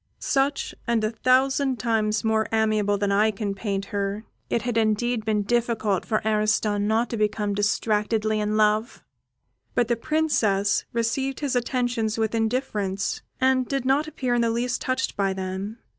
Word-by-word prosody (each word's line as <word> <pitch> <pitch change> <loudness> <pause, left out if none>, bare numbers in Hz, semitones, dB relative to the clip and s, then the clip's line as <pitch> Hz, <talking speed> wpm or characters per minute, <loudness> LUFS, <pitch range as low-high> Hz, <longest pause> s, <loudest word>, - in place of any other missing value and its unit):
Such, 275 +1 0
and 230 -2 +1
a 215 - 0
thousand 260 +2 +2
times 220 -3 0
more 220 0 +1
amiable 215 -2 +2
than 200 0 0
I 210 +2 +4
can 205 -1 -3
paint 195 -1 -3
her, 200 +2 -2 0.2
it 230 - 0
had 245 -2 -2
indeed 225 +1 +1
been 210 -2 +1
difficult 225 -3 0
for 220 -1 0
Ariston 210 -1 +1
not 225 +2 +1
to - - -5
have 230 - -2
become 210 -1 0
distractedly 215 +1 0
in 210 0 0
love; 215 +2 +1 0.7
but 240 -1 +2
the 235 - +3
Princess 230 -8 +1
received 260 +4 -1
his 280 -3 -1
attentions 245 -3 0
with 220 -1 0
indifference, 220 -4 -1 0.2
and 260 -1 +2
did 275 -2 -2
not 280 +4 +2
appear 255 -5 -2
in 240 - +2
the 230 - +2
least 240 +1 -1
touched 260 0 -1
by 195 -2 0
them. 190 +3 -5
220 Hz, 165 wpm, -25 LUFS, 210-245 Hz, 0.7 s, I